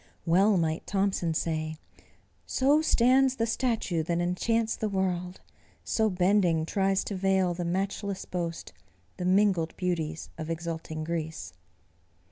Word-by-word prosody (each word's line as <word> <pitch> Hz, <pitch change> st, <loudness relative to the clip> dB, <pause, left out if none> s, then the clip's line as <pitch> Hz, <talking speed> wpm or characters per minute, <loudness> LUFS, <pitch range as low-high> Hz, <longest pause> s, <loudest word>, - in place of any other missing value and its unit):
Well 190 Hz, +4 st, +4 dB
might 160 Hz, -1 st, -1 dB
Thomson 190 Hz, -4 st, 0 dB
say: 155 Hz, -1 st, -2 dB, 0.7 s
"So 285 Hz, +4 st, +3 dB
stands 260 Hz, -2 st, +4 dB
the 230 Hz, -, 0 dB
statue 225 Hz, -7 st, 0 dB
that 170 Hz, +2 st, -1 dB
enchants 220 Hz, +6 st, 0 dB
the 215 Hz, -, -2 dB
world, 185 Hz, -2 st, -2 dB, 0.4 s
So 220 Hz, -1 st, +1 dB
bending 180 Hz, -3 st, +2 dB
tries 195 Hz, +2 st, +1 dB
to 200 Hz, -, -4 dB
veil 190 Hz, -1 st, +2 dB
the 175 Hz, 0 st, -4 dB
matchless 195 Hz, +2 st, -2 dB
boast, 170 Hz, -2 st, -4 dB, 0.4 s
The 180 Hz, -, -3 dB
mingled 185 Hz, -3 st, +2 dB
beauties 165 Hz, -3 st, -2 dB
of 160 Hz, 0 st, -5 dB
exulting 160 Hz, -1 st, -4 dB
Greece." 160 Hz, -, -4 dB
180 Hz, 125 wpm, -28 LUFS, 165-200 Hz, 0.7 s, Well